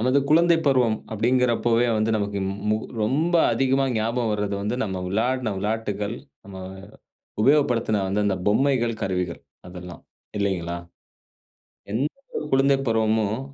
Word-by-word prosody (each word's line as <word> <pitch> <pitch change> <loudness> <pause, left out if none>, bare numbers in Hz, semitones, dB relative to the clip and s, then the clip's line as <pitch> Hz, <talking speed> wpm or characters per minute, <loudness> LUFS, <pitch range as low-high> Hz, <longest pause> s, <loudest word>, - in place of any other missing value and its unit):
நமது 130 +4 +3
குழந்தை 170 +2 +5
பருவம், 125 -5 +3 0.2
அப்படிங்கறப்பவே 120 +1 +2
வந்து 110 +1 +1
நமக்கு 100 -1 -2
மு 95 - -3 0.2
மு 110 - +3 0.3
ரொம்ப 150 +10 +1 0.2
அதிகமா 135 0 +2
ஞாபகம் 115 +1 0
வர்றது 105 -1 -1
வந்து, 105 +4 -1
நம்ம 95 -3 -4
விளையாடுன 120 +3 0
விளையாட்டுகள், 105 0 -2 0.3
நம்ம 95 -1 -10 0.9
உபயோகப்படுத்தின 120 -5 +3
அந்த 100 +2 0
அந்த 100 -2 +1
பொம்மைகள், 120 +1 +2
கருவிகள் 90 -3 -2 0.3
அதெல்லாம் 90 -1 -10 0.4
இல்லைங்களா? 90 -4 -1 1.1
எந்த 125 +7 +1 0.3
ஒரு - - -3
குழந்தை 135 +1 +4
பருவமும் 110 -1 +1
110 Hz, 125 wpm, -24 LUFS, 100-130 Hz, 1.1 s, குழந்தை